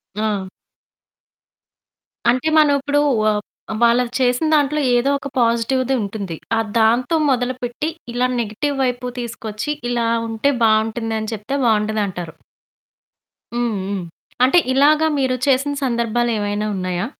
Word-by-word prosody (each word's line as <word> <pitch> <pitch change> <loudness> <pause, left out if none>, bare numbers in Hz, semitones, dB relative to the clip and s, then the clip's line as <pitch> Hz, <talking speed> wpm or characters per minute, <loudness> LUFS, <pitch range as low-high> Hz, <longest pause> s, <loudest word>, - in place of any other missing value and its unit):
ఆ! 210 -3 -1 1.8
అంటే, 255 +5 +1
మనం 300 -2 +5
ఇప్పుడు 290 +1 +1 0.3
ఆహ్, 210 -1 0 0.4
వాళ్ళది 235 +1 +3
చేసిన 250 +3 +2
దాంట్లో 295 +1 +2 0.2
ఏదో 245 +3 +2
ఒక 280 - -6
పాజిటివ్‌ది 240 +3 +1
ఉంటుంది. 200 -5 -5 0.2
ఆహ్, 225 -1 0
దాంతో 240 +7 +3
మొదలుపెట్టి, 250 +2 -1 0.2
ఇలా 250 +1 +1
నెగెటివ్ 235 +6 -2
వైపు 250 0 -1
తీసుకొచ్చి, 225 +2 -5 0.2
ఇలా 235 -1 0 0.2
ఉంటే 225 +6 +1
బావుంటుందని 220 0 +1
చెప్తే 220 +6 -3
బావుంటదంటారు. 210 -6 0 1.2
హ్మ్. 240 -2 -1
హ్మ్. 200 -2 -3 0.4
అంటే 265 +8 +5
ఇలాగా 300 +4 +4
మీరు 260 -1 +1
చేసిన 275 +1 +2
సందర్భాలేమైనా 230 -4 0
ఉన్నాయా? 185 0 -2
235 Hz, 110 wpm, -20 LUFS, 215-260 Hz, 1.8 s, మనం